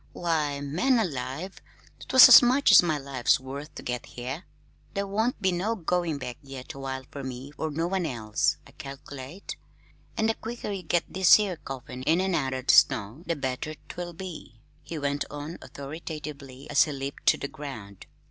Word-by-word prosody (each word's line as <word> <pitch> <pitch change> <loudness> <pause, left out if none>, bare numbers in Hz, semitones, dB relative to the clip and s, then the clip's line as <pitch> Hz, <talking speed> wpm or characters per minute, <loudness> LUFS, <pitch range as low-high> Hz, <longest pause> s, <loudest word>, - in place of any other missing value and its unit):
"Why, 155 -5 -1
man 180 - +2
alive, 160 - -3 0.5
'twas 260 - +10
as 255 - +11
much 255 0 +4
as 200 - +10
my 160 -4 0
life's 135 -3 +1
worth 140 +3 -8
to - - -8
get 125 -1 -4
here. 130 +8 -6 0.5
There 200 0 0
won't 220 +5 -1
be 190 -3 +2
no 195 +6 -1
goin' 175 -4 -1
back 125 -3 -6
yet 135 -2 -9
awhile 135 -1 -5
fer 140 - -6
me 130 +2 -7
nor 160 - -1
no 160 +3 -1
one 180 -1 -1
else, 110 -6 0
I - - -16
calc'late. 140 +5 -9 0.6
An' 220 - +1
the 225 - +3
quicker 230 -1 -6
you 195 -2 -3
get 175 -1 +1
this 190 +2 +6
'ere 195 -5 -1
coffin 130 -2 -8
in 180 +7 +2
out 135 -5 0
of 130 -1 -4
the - - +5
snow, 110 +7 +4
the 170 - 0
better't 140 +2 -5
will 175 0 -5
be," 160 -10 -9 0.2
he 165 - -7
went 145 -1 -1
on 145 +3 -7
authoritatively 145 -2 -8
as - - +5
he 150 - -5
leaped 140 0 -6
to - - +6
the 140 - -4
ground. 110 -10 -9
150 Hz, 185 wpm, -27 LUFS, 135-180 Hz, 0.6 s, as